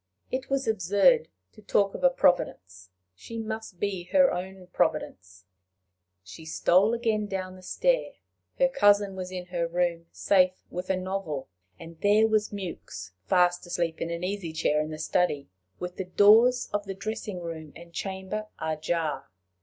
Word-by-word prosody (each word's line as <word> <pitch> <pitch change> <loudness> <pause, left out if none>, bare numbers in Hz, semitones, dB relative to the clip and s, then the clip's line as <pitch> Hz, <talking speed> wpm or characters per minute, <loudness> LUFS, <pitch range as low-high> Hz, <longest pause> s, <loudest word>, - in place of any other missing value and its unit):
It 260 0 -3
was 275 -1 0
absurd 215 - +3 0.3
to 215 - -16
talk 200 -1 +1
of - - -7
a 270 - +7
Providence! 95 - 0 0.2
She 230 - -9
must 220 -4 -5
be 195 -3 -2
her 275 +8 +4
own 185 +1 -6
providence! 90 -1 -2 0.8
She 95 - -11
stole 185 +7 +3
again 220 -3 0
down 185 -1 -4
the 185 - -14
stair. - - 0 0.4
Her - - +4
cousin 205 - +3
was 185 -1 -5
in 180 -1 -5
her 170 -1 0
own 165 - -18
room 175 -1 0
safe 185 -1 +2
with 180 +1 -5
a 190 - +2
novel, 185 - -4 0.3
and 165 -1 -12
there 210 +2 +5
was 215 -1 +1
Mewks 170 - -7 0.2
fast 180 -1 +3
asleep 170 -2 -2
in 165 - -2
an 170 +1 -4
easy 185 -3 -3
chair 150 -1 +1
in 155 - -4
the 155 - -6
study, 155 - 0 0.3
with 180 0 -6
the 190 - -3
doors 225 +7 +5
of 205 0 -1
the 195 - -4
dressing 210 -1 -5
room 160 -3 -7
and 170 0 -13
chamber 195 +3 -4
ajar! 160 0 -2
185 Hz, 165 wpm, -27 LUFS, 170-210 Hz, 0.8 s, a